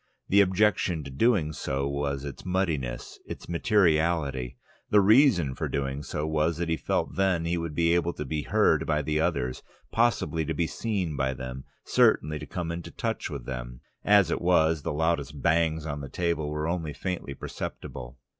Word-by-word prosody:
The 100 Hz, +1 st, +6 dB
objection 95 Hz, -4 st, +2 dB
to 70 Hz, -, -8 dB
so -, -, -11 dB
doing 90 Hz, -, +2 dB, 0.4 s
was 70 Hz, -1 st, -2 dB
its 70 Hz, -, -7 dB
muddiness, 80 Hz, -10 st, -2 dB
its -, -, -8 dB
materiality; 80 Hz, -, +1 dB, 0.3 s
the 105 Hz, -, +6 dB
reason 100 Hz, -, +5 dB
for -, -, -3 dB
so -, -, -8 dB
doing 70 Hz, +1 st, -2 dB, 0.3 s
was 80 Hz, +1 st, +1 dB
that 85 Hz, -1 st, -2 dB
he 80 Hz, -, +2 dB
felt 80 Hz, -, -1 dB
that -, -, -13 dB
then 95 Hz, -4 st, +2 dB
he 85 Hz, +1 st, 0 dB
would 85 Hz, -3 st, -4 dB
be 85 Hz, +1 st, +3 dB
able 85 Hz, 0 st, +2 dB
to 75 Hz, -, -5 dB
be 75 Hz, +3 st, -2 dB
heard 80 Hz, -4 st, +2 dB
by 75 Hz, -1 st, +1 dB
the 75 Hz, +1 st, 0 dB
others, 65 Hz, -5 st, -1 dB, 0.3 s
possibly 115 Hz, -8 st, +1 dB
to 80 Hz, +1 st, -2 dB
be 85 Hz, -, +1 dB
seen 95 Hz, -5 st, -2 dB
by 65 Hz, -1 st, 0 dB
them, 65 Hz, +1 st, -7 dB, 0.2 s
certainly 75 Hz, +1 st, +3 dB
to -, -, -8 dB
come 85 Hz, -2 st, -4 dB
into 85 Hz, 0 st, -6 dB
touch -, -, -3 dB
with -, -, -6 dB
them. -, -, -6 dB, 0.2 s
As 100 Hz, -5 st, +5 dB
it -, -, -1 dB
was, 80 Hz, -3 st, +3 dB
the -, -, -3 dB
loudest 75 Hz, -2 st, -1 dB
bangs 80 Hz, 0 st, +1 dB
on 75 Hz, -2 st, -4 dB
the 70 Hz, -, -7 dB
table 85 Hz, -3 st, -1 dB
were 75 Hz, +1 st, -2 dB
only 85 Hz, -3 st, -2 dB
faintly 90 Hz, -7 st, -4 dB
perceptible. 65 Hz, -1 st, -7 dB
80 Hz, 185 wpm, -27 LUFS, 70-85 Hz, 0.4 s, The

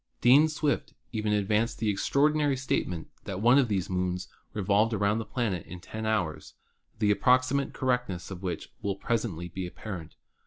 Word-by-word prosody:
Dean 135 Hz, +6 st, +7 dB
Swift 150 Hz, -1 st, -1 dB, 0.2 s
even 110 Hz, -2 st, -1 dB
advanced 105 Hz, +2 st, +1 dB
the 110 Hz, -2 st, +1 dB
extraordinary 145 Hz, +6 st, +2 dB
statement 90 Hz, -10 st, -2 dB, 0.2 s
that 95 Hz, -1 st, -4 dB
one 120 Hz, +6 st, +6 dB
of 130 Hz, -, +3 dB
these 95 Hz, -5 st, -1 dB
moons 90 Hz, -1 st, -2 dB, 0.2 s
revolved 105 Hz, +2 st, +2 dB
around 100 Hz, +2 st, +1 dB
the 115 Hz, -, -4 dB
planet 105 Hz, -9 st, -2 dB
in 90 Hz, -, -8 dB
10 110 Hz, +4 st, -5 dB
hours, 90 Hz, -8 st, -1 dB, 0.4 s
the 105 Hz, -1 st, +3 dB
ap 100 Hz, -, +1 dB
proximate 130 Hz, +4 st, +3 dB
correctness 125 Hz, -9 st, -1 dB
of 90 Hz, -1 st, -7 dB
which 90 Hz, -4 st, -4 dB
will 100 Hz, -1 st, -1 dB
presently 100 Hz, -6 st, -2 dB
be 90 Hz, +1 st, -5 dB
appar 95 Hz, 0 st, -6 dB
ent. 80 Hz, -, -13 dB
105 Hz, 170 wpm, -28 LUFS, 95-125 Hz, 0.4 s, Dean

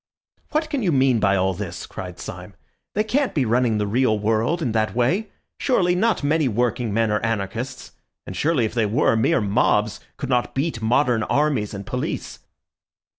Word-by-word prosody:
"What 310 Hz, 0 st, -1 dB
can 285 Hz, -4 st, -1 dB
you 185 Hz, -6 st, +1 dB
mean 130 Hz, -4 st, +3 dB
by 100 Hz, -1 st, +3 dB
all 95 Hz, 0 st, +1 dB
this?" 90 Hz, -2 st, -6 dB
cried 90 Hz, -1 st, -8 dB
Syme. 90 Hz, +2 st, -8 dB, 0.4 s
"They 210 Hz, -, +2 dB
can't 260 Hz, +5 st, 0 dB
be 140 Hz, -5 st, +2 dB
running 120 Hz, -1 st, +2 dB
the 105 Hz, -, 0 dB
real 110 Hz, +1 st, +2 dB
world 110 Hz, +10 st, +1 dB
in 120 Hz, -, 0 dB
that 110 Hz, 0 st, 0 dB
way. 175 Hz, -, +1 dB, 0.3 s
Surely 180 Hz, -9 st, +2 dB
not 215 Hz, 0 st, +1 dB
many 150 Hz, 0 st, +2 dB
working 120 Hz, 0 st, 0 dB
men 110 Hz, +1 st, +1 dB
are 105 Hz, -, +2 dB
anarchists, 115 Hz, +3 st, -3 dB, 0.3 s
and 95 Hz, -, -7 dB
surely 145 Hz, -, +1 dB
if 110 Hz, -, -4 dB
they 115 Hz, -3 st, +1 dB
were, 115 Hz, +2 st, +2 dB
mere 110 Hz, 0 st, +2 dB
mobs 105 Hz, 0 st, +1 dB, 0.2 s
could 135 Hz, -, -4 dB
not 125 Hz, -2 st, 0 dB
beat 135 Hz, -3 st, -1 dB
modern 120 Hz, +1 st, +2 dB
armies 130 Hz, -5 st, 0 dB
and 100 Hz, 0 st, -7 dB
police." -, -, -4 dB
120 Hz, 180 wpm, -22 LUFS, 105-150 Hz, 0.4 s, mean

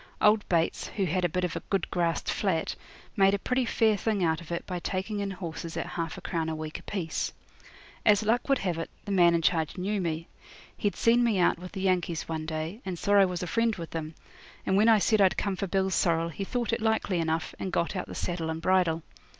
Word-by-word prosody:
Old 210 Hz, 0 st, +4 dB
Bates, 170 Hz, -2 st, +1 dB
who 195 Hz, -, -1 dB
had 180 Hz, +2 st, 0 dB
a 175 Hz, -, +2 dB
bit 180 Hz, +3 st, -1 dB
of 180 Hz, -, -1 dB
a -, -, -1 dB
good 195 Hz, -4 st, 0 dB
grassed 170 Hz, -2 st, 0 dB
flat, 180 Hz, -6 st, 0 dB, 0.4 s
made 195 Hz, 0 st, +5 dB
a -, -, 0 dB
pretty 250 Hz, +5 st, 0 dB
fair 225 Hz, -1 st, +3 dB
thing 205 Hz, -2 st, 0 dB
out 160 Hz, 0 st, +1 dB
of 170 Hz, -, -11 dB
it 170 Hz, -, -3 dB
by 180 Hz, -1 st, -4 dB
taking 190 Hz, +4 st, -3 dB
in 200 Hz, 0 st, -2 dB
horses 170 Hz, -3 st, -6 dB
at -, -, -2 dB
half 170 Hz, -2 st, -4 dB
a -, -, -8 dB
crown 165 Hz, -3 st, -2 dB
a 160 Hz, -, -2 dB
week 155 Hz, 0 st, -5 dB
apiece. 175 Hz, -6 st, -3 dB, 0.7 s
As 210 Hz, 0 st, +5 dB
luck 230 Hz, +5 st, +1 dB
would 275 Hz, -, +4 dB
have 180 Hz, -6 st, -2 dB
it, 165 Hz, -, -4 dB, 0.2 s
the 205 Hz, -, -4 dB
man 175 Hz, -3 st, +5 dB
in 165 Hz, -, 0 dB
charge 160 Hz, 0 st, +1 dB
knew 195 Hz, +2 st, -1 dB
me; 165 Hz, -1 st, -2 dB, 0.5 s
he'd 205 Hz, -, -1 dB
seen 235 Hz, +1 st, +4 dB
me 230 Hz, -4 st, +2 dB
out 175 Hz, -2 st, +3 dB
with 180 Hz, 0 st, -9 dB
the 190 Hz, -, -4 dB
Yankees 180 Hz, -3 st, 0 dB
one 160 Hz, -1 st, -4 dB
day, 160 Hz, +7 st, -4 dB
and 185 Hz, -2 st, -4 dB
saw 205 Hz, +4 st, 0 dB
I 200 Hz, -1 st, +7 dB
was 180 Hz, -1 st, -3 dB
a -, -, -1 dB
friend 230 Hz, +4 st, +1 dB
with 165 Hz, -2 st, -7 dB
them, 160 Hz, -1 st, -5 dB, 0.5 s
and 190 Hz, -, +2 dB
when 215 Hz, +3 st, +5 dB
I 225 Hz, -, +7 dB
said 215 Hz, +1 st, +3 dB
I'd 190 Hz, -2 st, +4 dB
come 200 Hz, -2 st, 0 dB
for 195 Hz, -, -3 dB
Bill's 190 Hz, +1 st, +1 dB
sorrel 165 Hz, -1 st, +2 dB
he 180 Hz, +4 st, -5 dB
thought 240 Hz, +1 st, -1 dB
it 230 Hz, -, -1 dB
likely 220 Hz, -5 st, +1 dB
enough, 160 Hz, 0 st, -1 dB
and 190 Hz, -, -3 dB
got 170 Hz, +3 st, 0 dB
out 185 Hz, -, -3 dB
the -, -, -8 dB
saddle 170 Hz, -2 st, -2 dB
and 160 Hz, 0 st, -3 dB
bridle. 170 Hz, -2 st, +2 dB
180 Hz, 245 wpm, -28 LUFS, 165-205 Hz, 0.7 s, I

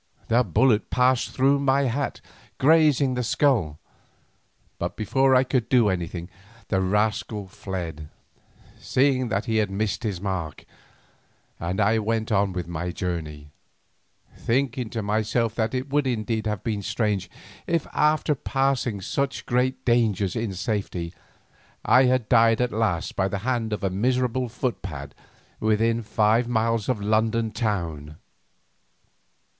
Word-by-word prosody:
The 120 Hz, +2 st, +4 dB
bullet 110 Hz, +3 st, +2 dB
passed 125 Hz, 0 st, +2 dB
through 135 Hz, +2 st, +2 dB
my 140 Hz, 0 st, +2 dB
hat, 135 Hz, +2 st, -2 dB, 0.4 s
grazing 150 Hz, -2 st, +4 dB
the 125 Hz, -, -1 dB
skull, 125 Hz, -, +1 dB, 1.0 s
but -, -, -3 dB
before 130 Hz, +5 st, +2 dB
I 130 Hz, -, +5 dB
could 125 Hz, -3 st, -1 dB
do 120 Hz, -5 st, +4 dB
anything 85 Hz, -1 st, -3 dB, 0.4 s
the 95 Hz, -2 st, +1 dB
rascal 105 Hz, +1 st, 0 dB
fled, 85 Hz, -6 st, -6 dB, 0.7 s
seeing 130 Hz, -1 st, +1 dB
that 100 Hz, 0 st, -1 dB
he 110 Hz, -2 st, 0 dB
had 105 Hz, -2 st, +1 dB
missed 100 Hz, +1 st, -2 dB
his 105 Hz, -6 st, -3 dB
mark, 95 Hz, -6 st, -4 dB, 0.9 s
and 90 Hz, +4 st, -3 dB
I 105 Hz, +2 st, +3 dB
went 110 Hz, +1 st, -1 dB
on 100 Hz, -2 st, +2 dB
my 85 Hz, +1 st, -4 dB
journey, 80 Hz, -5 st, -5 dB, 0.8 s
thinking 125 Hz, -1 st, -1 dB
to 110 Hz, -1 st, -4 dB
myself 110 Hz, +2 st, 0 dB
that 115 Hz, +2 st, -1 dB
it 130 Hz, +2 st, -3 dB
would 145 Hz, -1 st, +2 dB
indeed 110 Hz, -2 st, -1 dB
have 105 Hz, -3 st, -3 dB
been 105 Hz, -3 st, -2 dB
strange, 100 Hz, -2 st, -1 dB, 0.4 s
if 170 Hz, -2 st, 0 dB
after 150 Hz, 0 st, +2 dB
passing 135 Hz, -6 st, -1 dB
such 135 Hz, +7 st, -2 dB
great 125 Hz, +2 st, 0 dB
dangers 110 Hz, -6 st, +2 dB
in 115 Hz, -3 st, -2 dB
safety, 95 Hz, -4 st, -3 dB, 0.7 s
I 130 Hz, +1 st, +6 dB
had 125 Hz, -3 st, +1 dB
died 115 Hz, -1 st, +4 dB
at 125 Hz, -1 st, +1 dB
last 105 Hz, -7 st, -1 dB
by 95 Hz, -, +1 dB
the 100 Hz, -, -3 dB
hand 120 Hz, -4 st, -1 dB
of 105 Hz, -, -3 dB
a 95 Hz, -, 0 dB
miserable 125 Hz, +4 st, 0 dB
foot 125 Hz, 0 st, -3 dB
pad 70 Hz, -7 st, -7 dB, 0.5 s
within 115 Hz, +2 st, +1 dB
five 110 Hz, +2 st, +2 dB
miles 115 Hz, -1 st, 0 dB
of 125 Hz, -5 st, 0 dB
London 110 Hz, +2 st, +1 dB
town. 85 Hz, -10 st, -3 dB
110 Hz, 140 wpm, -24 LUFS, 100-125 Hz, 1.0 s, I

